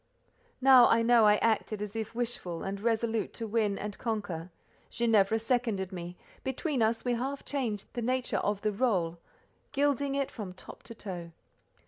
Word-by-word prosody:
Now 260 -2 +8
I 230 0 +4
know 235 -1 +6
I 210 - +6
acted 220 -1 0
as 210 +1 -5
if 220 0 -4
wishful 230 -8 -3
and 195 +1 -4
resolute 225 -1 0
to 230 - -4
win 210 -2 0
and 205 -1 -6
conquer. 195 -7 -3 0.4
Ginevra 220 -3 +3
seconded 225 -5 -1
me; 175 -1 -7 0.3
between 265 0 -1
us 225 +2 +1
we 245 - +2
half 265 +4 -3
changed 235 -8 -2
the 240 - -3
nature 255 +2 0
of 205 -1 -1
the 215 - +1
rôle, 190 -7 0 0.5
gilding 280 -1 +1
it 275 -1 -1
from 200 -6 -6
top 185 - -10
to 230 - -8
toe. 175 -6 -7
225 Hz, 165 wpm, -30 LUFS, 200-245 Hz, 0.5 s, Now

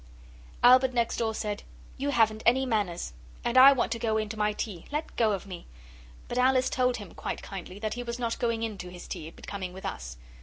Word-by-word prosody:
Albert 255 +1 +7
next 235 -1 +1
door 225 -1 0
said, 210 -2 -3 0.3
'You 280 +2 -2
haven't 220 -4 +3
any 260 +3 +4
manners, 205 - -1 0.3
and 240 - 0
I 260 +2 +10
want 255 -4 +1
to 230 - -1
go 220 -1 +1
in 215 -1 -1
to 220 - -5
my 210 0 +2
tea. 205 -4 -5
Let 300 +2 -3
go 225 -2 +3
of 195 - -4
me!' 180 -3 -9 0.6
But 245 - -2
Alice 255 0 +3
told 250 -1 +2
him, 205 -6 -10
quite - - -5
kindly, 190 -1 -7
that 215 +1 -3
he 245 - -4
was 235 0 -4
not 235 -2 -2
going 230 -1 0
in 215 -4 -4
to 180 - -6
his 180 0 -10
tea, 160 - -6
but - - -14
coming 190 -3 -5
with 190 - -9
us. - - -5
225 Hz, 230 wpm, -28 LUFS, 200-245 Hz, 0.6 s, I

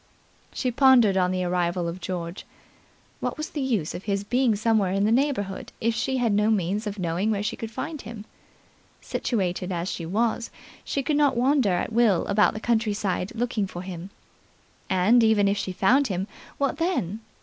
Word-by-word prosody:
She 255 - -2
pondered 245 -5 +5
on 180 -1 +2
the 185 0 -1
arrival 175 -1 0
of 170 +2 -5
George. 170 0 -5 0.8
What - - -3
was 305 +1 -5
the 295 - -3
use 225 - -1
of 180 - -7
his 200 -1 -1
being 245 +1 +2
somewhere 215 -3 +1
in 195 +1 +1
the 215 - +2
neighbourhood 235 -7 0
if 230 +1 +1
she 260 +3 -1
had 235 -4 +1
no 210 +1 +3
means 205 +1 0
of 205 0 -4
knowing 180 +3 -1
where 205 -2 0
she 215 - -2
could 225 - -6
find 305 +6 -5
him? 215 -1 -9 0.7
Situated 185 -5 -2
as 175 +1 -2
she 165 - -5
was, 225 +5 0 0.3
she 275 - -2
could 295 +1 +1
not 285 -4 +3
wander 255 -5 +3
at 180 - -2
will 220 -6 +3
about 210 +1 +3
the - - -3
countryside, 210 -4 0
looking 230 -4 -1
for 175 -1 -7
him. 185 0 -7 0.8
And, 200 +6 +4
even 215 -2 +4
if 200 +1 +1
she 195 -1 -3
found 250 +10 +3
him, 190 -1 -2 0.3
what 280 0 0
then? 310 - -1
210 Hz, 185 wpm, -25 LUFS, 185-240 Hz, 0.8 s, pondered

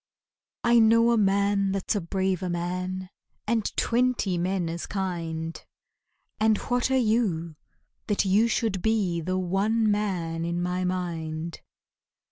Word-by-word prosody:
I 235 0 +5
know 230 +1 +5
a - - +4
man 200 -1 +2
that's 195 +2 -1
a 205 - 0
braver 185 +1 -1
man 180 +2 -3 0.3
And 225 -1 0
twenty 240 -5 +1
men 180 0 -1
as 170 +1 -4
kind, 165 -4 -4 0.8
And 215 0 +3
what 245 +1 0
are 265 - +3
you, 210 -9 +1 0.5
that 205 -1 +1
you 205 +4 +4
should 220 -5 0
be 200 -6 +1
The 185 +3 -1
one 205 +5 +1
man 180 -6 -1
in 170 +1 -2
my 180 +1 -1
mind? 170 -3 -3
190 Hz, 130 wpm, -26 LUFS, 175-215 Hz, 0.8 s, I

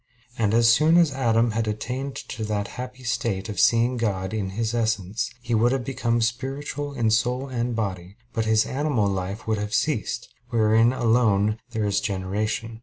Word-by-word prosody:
And 110 -3 +1
as 115 0 +5
soon 155 +8 +5
as 170 -4 +5
Adam 115 -3 +2
had 110 0 -1
attained 125 +6 -3
to 110 - -6
that 105 -1 -2
happy 125 0 -8
state 115 -4 -2
of 105 - -4
seeing 120 +2 +3
God 100 -4 -1
in 100 -3 -2
His 115 0 -1
Essence, 110 -3 -1
he 120 -1 -2
would 115 +2 +3
have 135 -2 0
become 120 -2 0
spiritual 140 +5 -3
in 115 -4 +1
soul 125 +4 +1
and 120 -1 -2
body; 95 -4 -4 0.2
and 110 -1 0
his 110 0 +3
animal 135 -6 0
life 95 +1 -3
would 110 -1 0
have 105 0 -2
ceased, 120 -5 -1 0.2
wherein 115 0 +4
alone 110 -4 +2
there 110 -3 -2
is 100 -1 +1
generation. 105 +3 -2
115 Hz, 180 wpm, -24 LUFS, 105-125 Hz, 0.2 s, as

